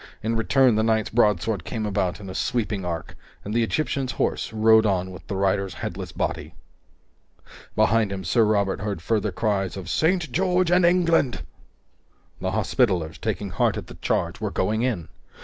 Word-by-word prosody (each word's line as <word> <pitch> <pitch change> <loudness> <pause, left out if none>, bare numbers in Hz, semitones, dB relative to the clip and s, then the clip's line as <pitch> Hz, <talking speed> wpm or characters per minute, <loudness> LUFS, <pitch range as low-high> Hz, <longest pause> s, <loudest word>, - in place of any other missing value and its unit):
In 115 +1 0
return, 125 +2 +3
the 110 - +2
knight's 110 -1 +1
broadsword 105 -3 +2
came 110 +3 -4
about 95 -3 -1
in 100 - -9
a 95 - -6
sweeping 105 -2 -1
arc, 85 -2 -5 0.3
and 105 - -4
the 120 - +2
Egyptian's 135 +2 -1
horse - - -1
rode 110 0 +5
on 95 -3 0
with 90 - -12
the 100 - -3
rider's 95 -1 0
headless - - -5
body. - - -3 1.2
Behind 110 -2 +3
him, 95 -1 -4
Sir 100 +7 +3
Robert 100 -3 +1
heard 105 -4 -3
further 105 +3 0
cries 95 -2 -1
of 90 -2 -6
"St. 165 -3 +1
George 180 +2 +1
and 175 -1 +5
England!" 170 -7 +2 1.0
The - - -2
Hospitallers, 90 -10 0
taking 105 -3 -3
heart - - +1
at - - -5
the - - -11
charge, - - -2
were - - -1
going 110 +1 0
in! 115 -10 -1
110 Hz, 170 wpm, -24 LUFS, 95-120 Hz, 1.2 s, rode